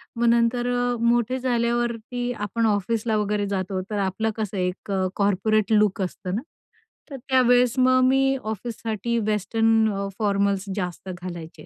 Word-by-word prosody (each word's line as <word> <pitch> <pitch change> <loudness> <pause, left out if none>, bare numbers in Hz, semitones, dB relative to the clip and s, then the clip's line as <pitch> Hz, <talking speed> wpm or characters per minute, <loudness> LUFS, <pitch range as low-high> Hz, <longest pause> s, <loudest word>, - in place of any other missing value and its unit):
मग 235 - 0
नंतर 235 +1 +2
अ, 245 0 0
मोठे 240 +2 +2
झाल्यावरती 240 0 -1
आपण 225 +1 -2
ऑफिसला 215 +2 0
वगैरे 210 0 0
जातो, 190 -1 -2
तर 210 - -1
आपलं 200 +3 -1
कसं 210 -2 -3
एक 180 +2 -3
अ, 190 -1 +1
कॉर्पोरेट 205 +2 +1
लुक 210 -1 +3
असतं 185 0 -4
ना, 225 - -2 0.7
तर 275 - -6
त्यावेळेस 250 -1 +4
मग 255 0 +4
मी 270 0 +3
ऑफिससाठी 225 +1 -3
वेस्टर्न 225 +2 +2
अ, 200 0 -3
फॉर्मल्स 200 -1 +1
जास्त 180 -1 -4
घालायचे, 175 -2 -8
220 Hz, 145 wpm, -24 LUFS, 200-240 Hz, 0.7 s, त्यावेळेस